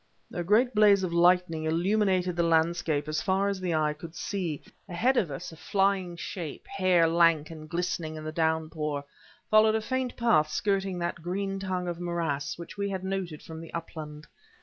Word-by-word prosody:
A 175 - -2
great 230 +8 +3
blaze 205 -2 +5
of 175 -2 -2
lightning 170 -2 +3
illuminated 185 +2 +1
the 175 - +1
landscape 165 -2 +1
as 155 0 -1
far 195 +1 +1
as 200 -1 -2
the 175 -3 0
eye 155 -1 +1
could 160 +2 -10
see. 175 -5 -3 0.3
Ahead 235 +10 +2
of 195 -9 +2
us 135 +3 -6
a - - -11
flying 190 0 0
shape, 165 -3 -6
hair 185 -4 +3
lank 165 -2 +3
and 155 -1 -10
glistening 170 -2 -2
in 155 - -7
the 155 - -4
downpour, 155 -2 -1 0.5
followed 215 0 +6
a - - +2
faint 260 +2 -2
path 155 -11 +3
skirting 195 +1 0
that 175 -1 -3
green 195 +3 -2
tongue 185 -2 -2
of 175 -1 -4
morass 165 -5 -2
which 170 +4 -9
we 200 0 0
had 190 -1 -4
noted 190 -5 -4
from 160 0 -8
the 165 - -10
upland. 155 -2 -7
175 Hz, 185 wpm, -28 LUFS, 160-195 Hz, 0.5 s, followed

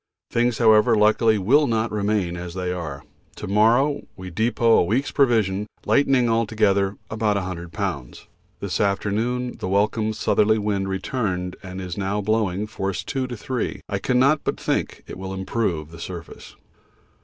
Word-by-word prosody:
Things, 120 0 +1
however, 110 -2 +5
luckily 110 +1 +4
will 135 +10 +3
not 115 -1 0
remain 100 -4 0
as 85 0 -7
they 90 -1 -2
are. 75 -5 -6 0.3
To - - -7
morrow 120 +8 +3
we 95 -1 -8
depot 115 +4 +3
a - - +4
week's 115 +11 0
provision, 105 -7 +2 0.2
lightening 135 -3 +3
altogether 105 -3 +1
about 110 -1 +1
100 90 -3 -4
lbs. 85 - -4 0.4
This - - -2
afternoon 110 +5 -1
the - - -3
welcome 105 +3 +1
southerly 110 0 +2
wind 100 -2 -1
returned 95 -3 -2
and 95 -1 -7
is 90 0 -5
now 100 +1 -1
blowing 105 -2 0
force 100 -2 -3
2 130 -2 -2
to 120 -2 -6
3. 125 +2 -3
I 100 - -2
cannot 130 +6 +2
but - - -2
think - - -2
it - - -9
will 95 0 -5
improve 95 -5 -2
the 85 - -11
surface. 85 -3 -9
105 Hz, 155 wpm, -23 LUFS, 95-115 Hz, 0.4 s, however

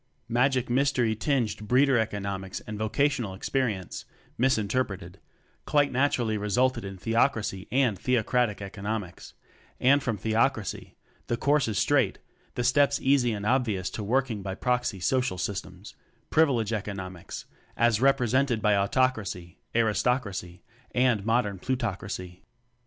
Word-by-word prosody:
Magic 125 +1 +2
Mystery 125 -3 +2
tinged 110 -4 -1
Breeder 135 +3 +4
economics 100 -3 -3
and 105 - -7
vocational 120 -2 0
experience 105 -4 -2 0.3
(misinterpreted) 105 -6 -1 0.5
quite 145 -1 +3
naturally 125 -5 +1
re 105 - -3
sulted 130 +3 +2
in 95 -1 -7
Theocracy 110 -2 0
and 125 -7 +2
Theocratic 120 -3 +1
economics; 100 -1 -5 0.4
and 140 +3 +4
from 120 -5 -2
Theocracy 110 +1 -1 0.3
the 120 - -1
course 145 +1 +2
is 110 -3 -2
straight, - - +2 0.4
the 120 - -1
steps 140 +3 +3
easy 130 -3 +3
and 105 -2 -4
obvious 110 -7 0
to 110 - -5
Working 120 -1 0
by 95 0 -4
proxy 120 -3 -1
social 125 +1 0
systems 95 +1 -5 0.4
Privilege 125 -9 +3
economics 95 -4 -6 0.3
as 120 -2 +3
represented 130 -2 +2
by 105 -1 +3
Autocracy, 100 -5 0 0.2
Aris 110 -4 +2
tocracy, 100 -8 -2 0.3
and 125 -5 +3
modern 115 -4 +1
Plutocracy. 95 -7 -4
115 Hz, 125 wpm, -27 LUFS, 100-130 Hz, 0.5 s, Breeder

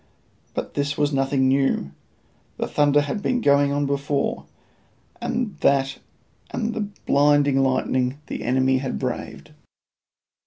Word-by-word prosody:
But - - -4
this 145 0 -1
was 145 0 +1
nothing 135 0 +2
new: 135 - +1 0.7
the - - -1
thunder 145 0 +3
had 145 +8 -3
been 245 +3 0
going 140 -6 +3
on 145 0 0
before, 140 0 -1 0.8
and 240 -6 -2
that 135 0 +2 0.5
and 230 -1 -2
the 225 - -3 0.2
blinding 145 -1 +4
lightning 130 0 0
the - - -5
enemy 130 +1 +2
had 130 -1 -3
braved. - - -5
140 Hz, 125 wpm, -23 LUFS, 135-145 Hz, 0.8 s, blinding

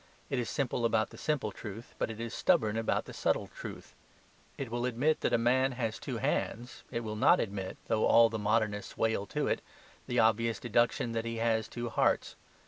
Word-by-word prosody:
It 135 - +1
is 120 - -2
simple 125 -3 -1
about 110 -1 +2
the - - -11
simple 145 -9 -1
truth; 105 +3 -9
but - - 0
it 110 -1 -7
is 115 0 -4
stubborn 110 -13 +2
about 115 0 0
the - - -9
subtle - - 0
truth. - - -8 0.6
It 135 -5 -5
will 120 +1 0
admit 130 +6 +1
that - - +1
a - - +4
man 130 +3 +2
has 115 -2 -2
two - - -4
hands, 120 +2 -2
it 120 -2 -3
will 110 -1 -4
not 105 - +5
admit 100 -3 -3
(though 110 -1 +2
all 115 0 +7
the 110 0 -4
Modernists 105 -1 0
wail 110 -3 0
to 150 +6 -1
it) - - 0 0.5
the 120 - -2
obvious 115 -1 +3
deduction 120 0 +1
that 115 0 -2
he 115 0 -3
has 115 -1 +1
two 120 0 -4
hearts. - - +1
115 Hz, 205 wpm, -31 LUFS, 110-120 Hz, 0.6 s, all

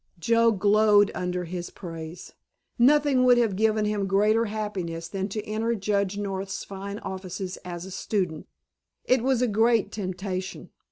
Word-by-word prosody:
Joe 230 +6 +3
glowed 205 0 +4
under 180 0 -2
his 175 0 -5
praise. 165 -2 -9 0.5
Nothing 280 0 +4
would 250 -1 +6
have 225 -5 +2
given 215 +1 +2
him 210 -2 -1
greater 210 +4 +3
happiness 195 -6 -4
than 195 0 -3
to 210 +1 -4
enter 225 +2 -1
Judge 200 -1 -1
North's 195 -1 -4
fine 200 +1 -7
offices 190 -2 -6
as 175 0 -7
a 190 - -9
student. 180 -5 -2 0.6
It 255 -1 +3
was 255 0 +2
a - - +3
great 225 -1 +2
temptation. 190 -1 -5
200 Hz, 150 wpm, -26 LUFS, 185-220 Hz, 0.6 s, would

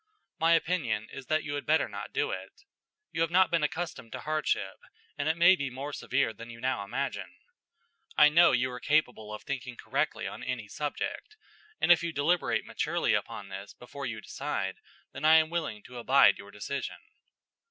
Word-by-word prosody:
My 165 +1 +5
opinion 155 -11 0
is 135 -2 -9
that 155 0 +1
you 145 - -4
had 145 - -4
better 160 +1 +3
not - - -7
do 445 +2 0
it. - - -7 0.5
You - - -2
have 165 - +2
not 185 +2 +4
been 170 -2 +3
accustomed 150 -6 -3
to - - -5
hardship, 150 -10 -1 0.4
and 145 +2 -1
it 160 - +1
may 180 +2 +7
be 140 -6 -3
more 135 +4 -6
severe 130 -4 0
than 115 +3 -10
you 115 0 -10
now 130 -5 -1
imagine. 135 +8 -4 0.8
I 150 - +9
know 170 +3 +6
you 125 0 +1
are 125 - -6
capable 125 -8 +1
of 105 - -7
thinking 130 -3 -5
correctly - - -1
on - - -6
any 120 -4 -3
subject, 150 - -4 0.4
and - - +4
if 175 - +7
you 170 0 -2
deliberate 160 +4 +1
maturely - - 0
upon 100 -1 -3
this 95 +1 -8
before 140 +2 -7
you 110 -2 -5
decide, 95 -10 -3 0.3
then 140 - -8
I 155 +1 +7
am 160 0 +4
willing 155 -12 -3
to 125 -1 -9
abide 135 +3 +5
your - - -10
decision." - - -5
140 Hz, 190 wpm, -29 LUFS, 120-160 Hz, 0.8 s, I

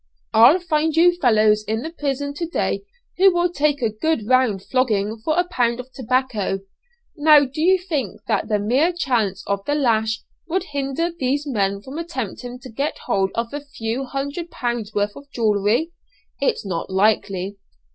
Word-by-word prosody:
I'll 235 +10 +7
find 320 -3 0
you 350 +2 +5
fellows 215 -8 +3
in 220 +3 -2
the 320 - -5
prison 285 -3 -3
to 335 +3 -4
day 340 - -1 0.4
who 385 0 +7
will 350 0 +1
take 290 -4 0
a 225 - +2
good 225 +2 -1
round 250 -6 +2
flogging 220 -4 0
for 310 +5 0
a 355 0 +2
pound 240 -6 0
of 250 +1 -8
tobacco! 250 -6 -1 0.5
now 300 -1 +6
do 275 +4 -5
you 375 +3 +5
think 305 - -3
that - - 0
the 215 -2 +1
mere 255 - +2
chance 225 - 0
of 200 0 -2
the 290 - 0
lash 220 -5 +1 0.3
would 355 +2 0
hinder 285 +1 -2
these 285 -2 -1
men 200 -6 -1
from 275 +4 -7
attempting 250 -7 -5
to 255 - -10
get 280 +7 -2
hold 195 -1 +1
of 230 +2 -2
a 290 - -3
few 260 -2 -4
hundred 285 +6 -4
pounds' 240 -6 -3
worth 205 -1 -1
of 280 0 -12
jewellery? 225 +5 +1 0.5
It's 485 - 0
not 175 -4 -3
likely. 195 -1 +1
255 Hz, 175 wpm, -21 LUFS, 215-305 Hz, 0.5 s, I'll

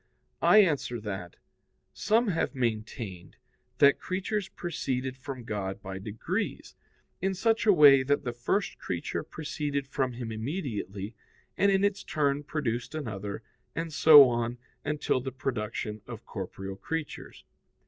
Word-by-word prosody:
I 215 0 +7
answer 140 -8 -1
that, 95 -5 -6 0.6
Some 225 +1 +2
have 165 -4 -1
maintained 110 -6 -3 0.4
that 140 -1 +6
creatures 190 +1 -2
proceeded 130 -6 -3
from 130 -1 -7
God 100 -3 -3
by 95 -1 -6
degrees, 105 +2 -4 0.5
in 190 +1 0
such 225 +3 +1
a - - +9
way 145 -6 +8
that 145 +2 +1
the 120 -3 -3
first 125 - -1
creature 85 -2 -3
proceeded 145 -2 -3
from 130 -2 -1
Him 120 -1 -5
immediately, 110 - -4 0.4
and 200 0 +3
in 195 0 +3
its 205 -1 +1
turn 145 -2 0
produced 140 -2 -3
another, 110 -7 -5 0.3
and 165 0 -3
so 145 -3 +9
on 120 0 -1 0.3
until 145 -3 0
the 130 +1 -4
production 110 -4 -3
of 115 -2 -8
corporeal 95 -1 -6
creatures. 160 +9 -5
130 Hz, 135 wpm, -29 LUFS, 110-155 Hz, 0.6 s, a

